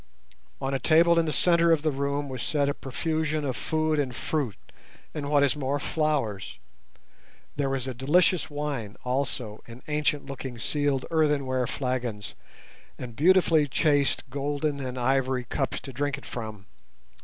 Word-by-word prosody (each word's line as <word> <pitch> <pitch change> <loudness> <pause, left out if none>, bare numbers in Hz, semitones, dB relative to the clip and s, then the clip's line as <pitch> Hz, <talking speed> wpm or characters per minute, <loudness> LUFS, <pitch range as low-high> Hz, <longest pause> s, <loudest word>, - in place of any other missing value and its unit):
On 135 0 -2
a 135 - 0
table 170 +3 +5
in 165 - +1
the - - 0
centre 170 +3 +4
of 160 -2 +3
the 155 - +2
room 140 +1 -1
was 130 -3 -5
set 145 +1 +1
a 145 - +1
profusion 155 +2 -2
of 130 -3 -1
food 155 +3 0
and 130 -4 -1
fruit, 135 - -2 0.6
and, 145 -2 -4
what 145 -1 +4
is 140 - +3
more, 140 -1 -1
flowers. 135 - -1 1.0
There 140 -2 0
was 135 -2 -2
a 130 - -3
delicious 155 +6 +3
wine 145 -8 -4
also 125 -4 -2
in 120 +2 -11
ancient 150 -1 0
looking 130 -2 -6
sealed 145 +3 0
earthenware 140 -6 +1
flagons, 125 -6 -3 0.6
and 120 -3 -7
beautifully 165 -1 +4
chased 145 0 +2
golden 145 +1 -1
and 130 -1 -4
ivory 130 0 +1
cups 135 +3 -2
to 135 - -8
drink 145 +2 -1
it - - -12
from. 110 -4 -6
140 Hz, 155 wpm, -27 LUFS, 130-150 Hz, 1.0 s, table